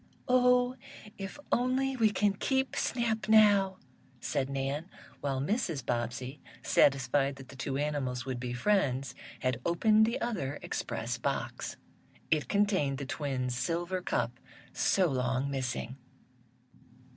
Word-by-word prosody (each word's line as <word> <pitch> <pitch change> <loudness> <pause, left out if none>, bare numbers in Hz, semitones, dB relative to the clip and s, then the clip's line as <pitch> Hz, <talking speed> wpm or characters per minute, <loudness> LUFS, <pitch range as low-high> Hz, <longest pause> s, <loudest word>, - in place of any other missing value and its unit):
"Oh, 250 0 +4 0.4
if 195 +7 -6
only 260 +2 +1
we 225 -3 +4
can 205 -1 +2
keep 265 +6 0
Snap 220 -4 -1
now," 205 -3 +6 0.4
said 130 +2 -1
Nan, 140 +5 -2 0.3
while 135 -2 -1
Mrs. 165 - -1
Bobbsey, 125 +3 -3 0.2
satisfied 140 0 +3
that 135 -2 -12
the - - -11
two 135 +1 -3
animals 140 -4 -2
would 130 -2 -3
be 125 0 -4
friends, 135 -2 +1 0.3
had 125 -1 0
opened 215 +5 +4
the 230 - -1
other 175 - -2
express - - -3
box. - - -3 0.5
It 155 -2 +2
contained 195 -10 +2
the 140 - -4
twins' 130 -3 -2
silver 175 +7 -1
cup, 120 -6 -1 0.3
so 190 - +3
long 130 -2 0
missing. 130 -1 -3
145 Hz, 125 wpm, -31 LUFS, 130-210 Hz, 0.5 s, now